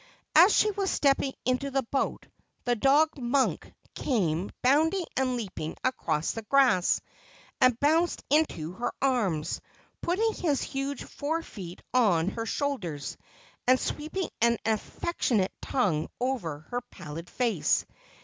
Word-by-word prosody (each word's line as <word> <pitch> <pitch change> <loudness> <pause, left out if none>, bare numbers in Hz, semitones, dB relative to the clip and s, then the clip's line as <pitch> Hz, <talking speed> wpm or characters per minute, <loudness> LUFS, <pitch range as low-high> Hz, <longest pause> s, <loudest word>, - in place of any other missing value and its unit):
As 350 +6 +8
she 425 - +4
was 395 -1 -1
stepping 275 -1 +2
into 255 +2 0
the 270 0 0
boat, 270 +4 -2 0.4
the 245 -1 +2
dog 285 +6 +3
Monk 255 +2 0 0.2
came 185 - 0
bounding 320 +8 +3
and 255 -1 +1
leaping 185 -9 -5
across 165 -12 0
the 225 - -5
grass, 225 -6 +3 0.6
and 250 -2 +5
bounced 320 +4 +2
into 290 - +2
her 230 +7 -3
arms, 200 - 0 0.4
putting 435 +6 +1
his 295 -6 0
huge 275 +1 -3
fore 320 +3 -3
feet 180 - -9
on 195 -9 +3
her 225 +2 -4
shoulders, 200 - -2 0.5
and 255 +1 +6
sweeping 315 +5 -3
an 235 0 +4
affectionate 220 - 0
tongue 185 - 0
over 215 - -2
her 245 0 -1
pallid 160 +4 -8
face. 230 -10 +1
255 Hz, 130 wpm, -28 LUFS, 195-285 Hz, 0.6 s, As